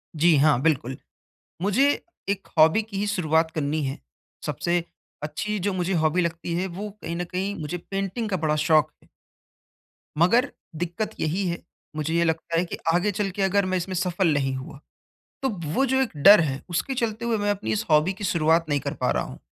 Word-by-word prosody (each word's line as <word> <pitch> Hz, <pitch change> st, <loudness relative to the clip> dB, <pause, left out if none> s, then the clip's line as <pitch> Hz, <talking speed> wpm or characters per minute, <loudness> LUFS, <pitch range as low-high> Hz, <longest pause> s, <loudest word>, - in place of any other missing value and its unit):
जी, 165 Hz, +2 st, +4 dB
हाँ, 145 Hz, -3 st, +4 dB
बिल्कुल। 135 Hz, -4 st, 0 dB, 0.6 s
मुझे 220 Hz, +9 st, +3 dB, 0.4 s
एक 200 Hz, -1 st, -2 dB
हॉबी 160 Hz, +7 st, +6 dB
की 210 Hz, -2 st, -8 dB
ही 205 Hz, +1 st, -1 dB
शुरुआत 160 Hz, -5 st, +1 dB
करनी 155 Hz, 0 st, -1 dB
है। 135 Hz, -1 st, -3 dB, 0.5 s
सबसे 175 Hz, 0 st, 0 dB, 0.4 s
अच्छी 210 Hz, +8 st, -3 dB
जो 200 Hz, +1 st, -1 dB
मुझे 185 Hz, +1 st, -1 dB
हॉबी 160 Hz, +1 st, +2 dB
लगती 170 Hz, 0 st, -3 dB
है 185 Hz, +2 st, -1 dB
वो 195 Hz, +4 st, -6 dB
कहीं 170 Hz, +1 st, -4 dB
न 175 Hz, -, -2 dB
कहीं 195 Hz, +3 st, -2 dB
मुझे 155 Hz, +4 st, -3 dB
पेंटिंग 195 Hz, +5 st, -3 dB
का 185 Hz, -, 0 dB
बड़ा 155 Hz, -1 st, 0 dB
शौक 155 Hz, 0 st, +3 dB
है। -, -, -25 dB, 1.1 s
मगर, 235 Hz, -, +4 dB, 0.2 s
दिक्कत 175 Hz, +6 st, -3 dB
यही 180 Hz, +5 st, 0 dB
है, 170 Hz, 0 st, -3 dB, 0.3 s
मुझे 155 Hz, +1 st, -2 dB
ये 170 Hz, 0 st, +3 dB
लगता 165 Hz, 0 st, -1 dB
है 170 Hz, -, +3 dB
कि -, -, -6 dB, 0.2 s
आगे 180 Hz, +4 st, +2 dB
चल 200 Hz, 0 st, -1 dB
के 200 Hz, -, -4 dB
अगर 195 Hz, 0 st, +2 dB
मैं 185 Hz, 0 st, 0 dB
इसमें 185 Hz, +1 st, -3 dB
सफल 175 Hz, -1 st, +1 dB
नहीं 135 Hz, -2 st, 0 dB
हुआ, 130 Hz, +1 st, -8 dB, 0.6 s
तो 265 Hz, -, +2 dB, 0.2 s
वो 270 Hz, -, +3 dB
जो 265 Hz, 0 st, +2 dB
एक 260 Hz, -, 0 dB
डर 195 Hz, +8 st, +8 dB
है 140 Hz, -4 st, -2 dB
उसके 175 Hz, +10 st, -1 dB
चलते 230 Hz, -1 st, -2 dB
हुए 230 Hz, -2 st, +1 dB
मैं 205 Hz, 0 st, +1 dB
अपनी 205 Hz, +1 st, -3 dB
इस 215 Hz, +1 st, -1 dB
हॉबी 155 Hz, +5 st, +4 dB
की 200 Hz, +2 st, -9 dB
शुरुआत 165 Hz, -2 st, +2 dB
नहीं 145 Hz, -1 st, +2 dB
कर -, -, -4 dB
पा -, -, +2 dB
रहा -, -, 0 dB
हूँ। -, -, -9 dB
175 Hz, 205 wpm, -25 LUFS, 155-200 Hz, 1.1 s, डर